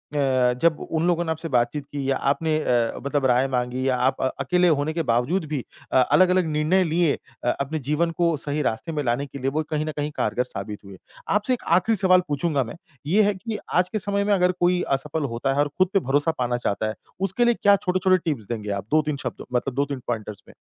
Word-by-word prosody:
अ, 130 -3 +2
जब 165 -2 +3
उन 165 +2 0
लोगों 175 -1 +2
ने 160 - -1
आपसे 160 +1 -3
बातचीत 120 +4 +1
की 140 -2 -4
या 135 - +2
आपने 155 +3 0
अ, 120 -5 +1
मतलब 140 -1 0
राय 130 +1 +3
माँगी 125 0 -1
या 130 - +2
आप 130 +2 0
अ, - - +2
अकेले 180 +6 +2
होने 155 -1 +1
के 165 0 -1
बावजूद 145 +10 +1
भी 145 -5 -2 0.3
अ, - - +3
अलग-अलग 185 +6 +4
निर्णय 155 +5 +2
लिए 165 -2 +2 0.3
अ, 120 - +1
अपने 150 +3 -2
जीवन 165 +3 +1
को 170 -2 +3
सही 145 +1 -2
रास्ते 125 +6 -2
में 150 -2 -2
लाने 125 +2 0
के 140 - -10
लिए, 135 +1 0
वो 155 +2 -1
कहीं 155 0 -1
ना 155 - -3
कहीं 150 +1 -2
कारगर 125 - 0
साबित 105 -4 -7
हुए। 95 -1 -11 0.4
आपसे 215 +5 +2
एक 250 - -4
आखिरी 220 +4 +1
सवाल 185 -2 +4
पूछूँगा 145 -1 0
मैं। 120 - -8 0.3
ये 205 +6 +4
है 205 0 +2
कि 215 +2 -5 0.2
आज 180 0 +2
के 215 - -2
समय 200 +1 -1
में 205 0 +2
अगर 180 -1 +3
कोई 180 0 +2 0.2
असफल 150 +2 -3
होता 135 +3 0
है 140 - -1
और 145 - +3
खुद 185 0 +4
पे 195 - +4
भरोसा 145 +2 +1
पाना 120 -1 0
चाहता 110 -2 -1
है, 110 - -4 0.2
उसके 195 +5 +2
लिए 240 - +4
क्या 200 0 +6
छोटे-छोटे 185 -1 +2
टिप्स 135 - -2
देंगे 105 -3 -4
आप 100 - -9
2-3 150 -1 +2
शब्दों - - -5
मतलब 125 +1 0
2-3 140 -1 -1
पॉइंटर्स 110 -3 -4
में। - - -15
150 Hz, 235 wpm, -24 LUFS, 130-175 Hz, 0.4 s, क्या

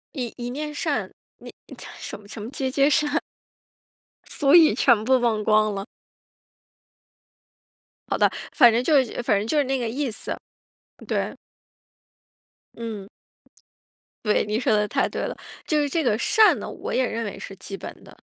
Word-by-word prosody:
”一 245 -5 -4
一 240 0 -4
面 300 +3 -5
善“， - - -2 0.3
那 - - -11 0.5
什 - - -6
么 205 - -18
什 210 +1 -9
么” 210 - -6
皆 265 -1 -2
皆 275 +2 +3
善“ 295 +1 +2 1.2
俗 280 -1 +2
语 330 -3 +8
全 235 -5 +4
部 260 +3 +4
忘 225 -3 0
光 215 0 +3
了。 195 0 -4 2.2
好 - - 0
的， - - +4 0.2
反 240 -5 +6
正 235 +2 +1
就 280 -1 +4
是 245 - -5
反 210 -3 +2
正 210 - -2
就 305 - 0
是 290 - +4
那 270 0 -1
个 235 -2 -2
意 270 +3 -2
思， - - -5 0.7
对。 - - -2 1.4
嗯。 220 -4 -6 1.2
对， 210 - +2
你 210 +2 -1
说 250 -2 +1
得 210 0 +2
太 - - +1
对 - - -5
了， - - -4 0.3
就 305 - +2
是 290 - +1
这 320 +3 -1
个 225 -5 +2
善 435 - +4
呢， - - -6
我 - - -6
也 255 - +2
认 230 +1 -3
为 205 - -6
是 195 - -9
基 195 0 -7
本 - - -8
的。 - - -16
240 Hz, 185 characters per minute, -24 LUFS, 215-280 Hz, 2.2 s, 语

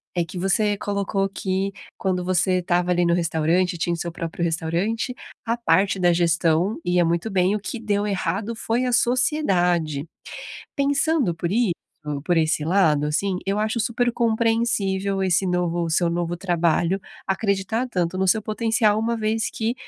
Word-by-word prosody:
é 175 -1 +1
que 175 +2 -7
você 205 +3 +2
colocou 200 -1 -1
que 195 0 -2 0.2
quando 180 -2 -1
você 185 +1 +2
estava 175 0 0
ali 175 0 +2
no 170 - +3
restaurante, 170 +1 +1
tinha 170 +1 -1
o - - -2
seu 170 0 -4
próprio 170 0 -4
restaurante, 170 +9 -1 0.3
a 230 0 +1
parte 195 -3 +2
da 175 -1 +4
gestão 170 +2 +1
ia 175 -1 +2
muito 170 +6 0
bem, 190 0 +2
o - - -2
que 225 +4 -5
deu 210 -2 -1
errado 200 +3 -2
foi 230 +3 -1
a 250 - 0
sociedade. 190 - +1 0.7
Pensando 280 - +1
por 170 +1 -3
isso, 220 -3 +2 0.5
por 175 +1 +1
esse 155 -1 +1
lado, 155 -4 +2
assim, 180 +5 0
eu 200 +1 0
acho 220 +2 0
super 235 +2 0
compreensível 220 -4 +1
esse 190 +1 +2
novo 175 -1 0
o - - -3
seu 170 +2 +2
novo 175 0 -2
trabalho 175 +1 +1 0.2
acreditar 200 +4 -1
tanto 180 -4 -1
no 190 0 0
seu 215 +3 +3
potencial, 220 0 +1
uma 230 +1 -1
vez 220 0 0
que 225 +1 -2
190 Hz, 165 wpm, -23 LUFS, 175-220 Hz, 0.7 s, da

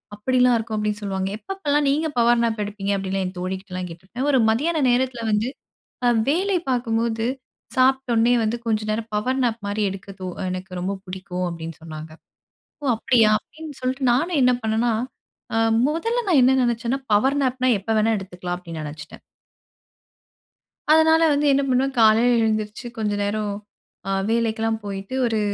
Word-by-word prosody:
அப்டிலாம் 250 +3 +3
இருக்கும் 220 -1 -4
அப்டின்னு 210 0 -2
சொல்லுவாங்க. 190 -1 -2
எப்பப்போலாம் 295 -4 -1
நீங்க 305 +3 +1
பவர் 235 0 +4
நாப் 225 -2 0
எடுப்பீங்க? 200 -1 -3
அப்டின்லாம் 195 0 -2
என் 185 0 -9
தோழிக்கிட்டலாம் 185 0 -4
கேட்டுருப்பேன். 190 - -5
ஒரு 265 - +4
மதியான 310 +8 0
நேரத்தில 245 -1 0
வந்து 210 +3 +1 0.8
வேலை 370 +5 +1
பார்க்கும்போது 230 -2 0 0.5
சாப்பிட்டோனே 255 -3 +3
வந்து 220 +2 0
கொஞ்சம் 215 -1 -1
நேரம் 220 +1 -3
பவர் 255 +6 0
நாப் 235 -2 -1
மாதிரி 205 +1 -2
எடுக்க 195 +1 -8
தோ 185 - -5 0.2
எனக்கு 185 +1 -6
ரொம்ப 190 +2 -1
பிடிக்கும் 185 -1 -5
அப்டின்னு 165 -1 -7
சொன்னாங்க. 155 -1 -8 0.7
ஓ - - -3
அப்டியா 225 -1 +3
அப்டின்னு 305 +3 -11
சொல்லிட்டு 260 +2 -2
நானும் 315 +5 +1
என்ன 250 0 +5
பண்ணணா, 220 +2 +1 0.6
அ - - +2 0.3
மொதல்ல 455 +11 -1
நான் 340 -7 +5
என்ன 265 +1 +4
நெனைச்சேன்னா 240 +2 0
பவர் 265 +7 +3
நாப்ன்னா 255 0 +1
எப்ப 195 - -21
வேண்ணாலும் 220 +1 +2
எடுத்துக்கலாம் 180 -1 -5
அப்டின்னு 170 -3 -8
நெனைச்சுட்டேன். 150 +1 -9 1.7
அதனால 320 +1 +5
வந்து 290 +1 +1
என்ன 275 +1 +3
பண்ணுவேன் 265 +1 +1
காலையில 225 +2 +5
எழுந்திரிச்சு, 215 +1 -2
கொஞ்ச 210 -2 0
நேரம் 210 0 -1 0.8
வேலைக்கெல்லாம் 225 -1 0
போயிட்டு 195 +3 -6
ஒரு 225 -2 0
225 Hz, 150 wpm, -23 LUFS, 200-260 Hz, 1.7 s, என்ன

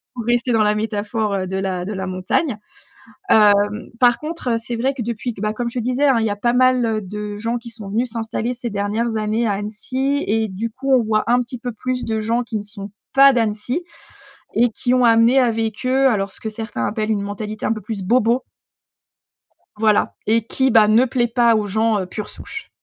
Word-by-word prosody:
pour 235 -3 -5
rester 240 +1 +1
dans 220 -1 +3
la 210 0 +2
métaphore, 215 0 -2
heu, 190 -1 -1
de 190 +1 -3
la 185 -2 -2
de 210 - -4
la 190 -1 -4
montagne. 185 - -1 0.7
Hem, 205 0 +4
par 245 -2 +5
contre, 310 -4 -5
heu, - - +2
c'est 235 +1 -5
vrai 265 +4 0
que 265 - -6
depuis 235 +1 -3
que, 195 - -10
bah, 215 - 0
comme 240 +1 -3
je 245 +1 -4
te - - -3
disais, 255 +4 +1
hein: 260 -4 +4
«Il 225 - 0
y 220 - +1
a 205 - -1
pas 240 +3 +1
mal 255 -1 +4
heu, 220 -1 -1
de 210 +1 -6
gens 230 +3 -2
qui 235 0 -9
sont 220 -3 -9
venus 235 +5 -1
s'installer 230 +1 -3
ces 240 -1 -5
dernières 215 +3 -1
années 215 +2 0
à - - +1
Annecy» 255 +7 -2
et 220 +1 +1
du 210 +5 -4
coup 270 +4 -4
on 255 - +6
voit 215 -1 +1
un 245 +1 +3
petit 250 +1 -6
peu 245 0 -4
plus 255 +3 -3
de 220 -1 -1
gens 230 +3 0
qui 230 -2 -4
ne 205 - -4
sont 205 -1 -9 0.2
pas 275 0 +7
d'Annecy 235 +7 -1 0.7
et 240 +2 +4
qui 245 +3 -1
ont 255 -1 +3
amené 230 +3 +5
avec 225 -1 0
eux 265 +1 +4
alors, 200 -4 0
ce - - -15
que 220 - -4
certains 215 - -4
appellent 215 0 -2
une 205 -2 0
mentalité 210 +1 -5
un 220 - +1
peu 215 - -4
plus 210 -1 -5
bobo. 235 +4 +2 1.3
Voilà 215 -1 +2
et 225 +1 +2
qui, 265 +1 +1
bah, 220 -2 +6
ne 225 +4 +5
plaît 245 -1 0
pas 235 -1 +3
aux 210 -1 -1
gens, 220 +1 +1
heu, 185 - -4
pure 210 +3 -6
souche. 445 - -9
225 Hz, 230 wpm, -20 LUFS, 210-245 Hz, 1.3 s, pas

